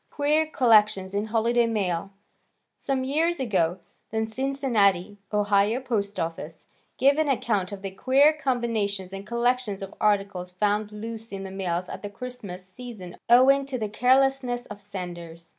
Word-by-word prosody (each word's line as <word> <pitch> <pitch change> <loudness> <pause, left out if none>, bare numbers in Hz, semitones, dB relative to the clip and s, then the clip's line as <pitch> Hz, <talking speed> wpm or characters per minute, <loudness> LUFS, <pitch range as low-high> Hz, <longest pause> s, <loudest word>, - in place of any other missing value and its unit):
Queer 300 +2 +1
Collection 215 -8 +4
in 205 +1 0
Holiday 230 +2 +2
Mail 195 -5 -1 0.7
Some 265 -1 -1
years 320 +5 +1
ago, 185 -9 +1 0.3
the 220 0 -1
Cincinnati, 220 -6 0
Ohio, 205 +2 +2
post 210 -6 -2
office, 165 -1 -5 0.3
gave 275 +3 +4
an 310 -2 +2
account 210 -7 0
of 200 -1 -8
the 195 - -4
queer 270 +9 +4
combinations 230 -9 -2
and 195 +1 -7
collections 235 -4 0
of 195 - -8
articles 195 -3 0
found 210 +2 0
loose 225 +1 -7
in 195 -1 -5
the 190 - -7
mails 180 -2 -2
at - - -7
the 205 - -5
Christmas 200 -5 -8
season 190 -3 -9
owing 265 +3 +6
to 265 -2 -3
the 215 -3 -3
carelessness 255 +1 +2
of 205 -1 -10
senders. 175 -4 -8
215 Hz, 150 wpm, -26 LUFS, 195-250 Hz, 0.7 s, owing